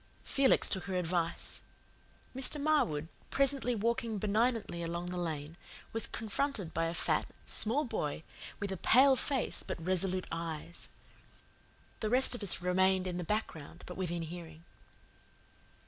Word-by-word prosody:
Felix 275 -1 +4
took 190 - -1
her 190 - -3
advice. 175 -1 -1 0.7
Mr. 270 +3 +3
Marwood, 280 - +2 0.2
presently 275 -3 +2
walking 230 +1 0
benignantly 215 -2 0
along 170 +1 -3
the 180 - -3
lane, 160 -1 -4 0.4
was 225 - +1
confronted 220 - -2
by 165 +1 +1
a 165 - -1
fat, - - +1 0.2
small 265 +8 +2
boy 160 - -3 0.4
with 200 -1 -3
a 190 - -3
pale 265 +8 +6
face 265 0 0
but - - -4
resolute 185 +2 0
eyes. 165 0 -4 1.1
The 215 - -1
rest 255 +3 +5
of 245 - -4
us 190 -2 +3
remained 185 +1 +3
in 180 -1 -2
the - - -2
background 170 -5 -4
but 180 - -7
within 175 -2 -2
hearing. 165 -1 -8
185 Hz, 140 wpm, -33 LUFS, 170-235 Hz, 1.1 s, pale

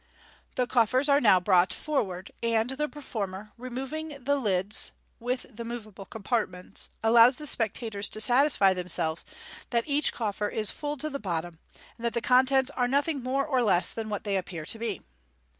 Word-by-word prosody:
The 250 - +1
coffers 250 +3 +2
are 280 +1 +5
now 205 -6 +6
brought 180 -1 +3
forward, 195 -12 -3
and 230 +1 +1
the 300 +3 -2
performer, 210 -8 -6
removing 270 +4 -6
the 285 +3 +2
l'ds 205 -5 +1 0.3
(with 250 +2 -3
the 235 - -6
moveable 215 -4 -8
compartments), 210 -5 -3
allows 235 +3 +6
the 300 - -7
spectators 220 -5 0
to 215 - -5
satisfy 245 -4 +4
themselves 175 -3 +2 0.5
that 235 -1 +1
each 290 +1 +1
coffer 210 -2 -2
is 215 -2 0
full 295 0 -4
to 305 +3 -3
the 280 - -4
bottom, 170 -4 -4 0.4
and - - -11
that 235 - 0
the 235 - 0
contents 260 +2 +3
are 250 -3 0
nothing 285 +2 0
more 265 +2 -1
or 265 -4 +1
less 195 -6 +3
than 225 -1 -5
what 205 -1 -4
they 200 -2 0
appear 175 -4 -5
to 225 - -1
be. 220 -5 -4
230 Hz, 175 wpm, -27 LUFS, 200-265 Hz, 0.5 s, now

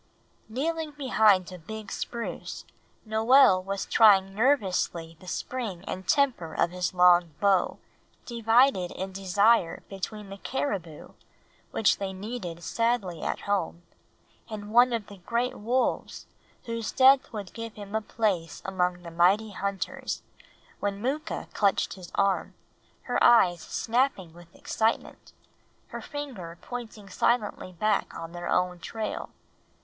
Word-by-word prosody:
Kneeling 310 +5 -2
behind 215 -10 +3
a 180 - -9
big 215 +5 -8
spruce, 235 -1 -5 0.4
Noel 220 -2 +5
was 195 +1 -3
trying 195 -3 +5
nervously 195 - +1
the 185 - -15
spring 210 -4 -4
and 185 0 -6
temper 255 - +1
of 170 - +1
his 180 -2 -2
long 175 -3 +5
bow, 195 -3 +2 0.5
divided 230 -4 +3
in 190 +1 -5
desire 195 0 +2
between 200 +1 -6
the 195 - -8
caribou, 190 - -4 0.6
which 220 - +2
they 195 -1 -3
needed 190 -4 -6
sadly 230 -6 -1
at - - -2
home, 185 -4 -2 0.7
and 210 -1 -7
one 245 +1 +6
of 230 -3 -2
the 200 -1 -13
great 235 +7 -1
wolves 245 +5 -1 0.4
whose 230 -1 -3
death 265 +1 +5
would 205 -4 -7
give 230 -1 -7
him 205 -1 -9
a 220 - +1
place 200 -8 -2
among 180 -2 -1
the 170 - -8
mighty 190 +6 +3
hunters, 200 0 -4 0.6
when 200 -1 -2
Mooka 275 +7 -3
clutched 200 -2 +1
his 185 -3 -11
arm, 200 -1 +1 0.5
her - - 0
eyes 180 -8 +6
snapping 230 -8 -1
with 170 0 -16
excitement, 225 +1 -2 0.6
her - - -6
finger 245 - -7
pointing 225 -4 -8
silently 210 -2 0
back 210 +3 0
on 165 0 -7
their 175 0 -6
own 180 -1 +1
trail. 215 +4 -5
200 Hz, 130 wpm, -27 LUFS, 180-230 Hz, 0.7 s, one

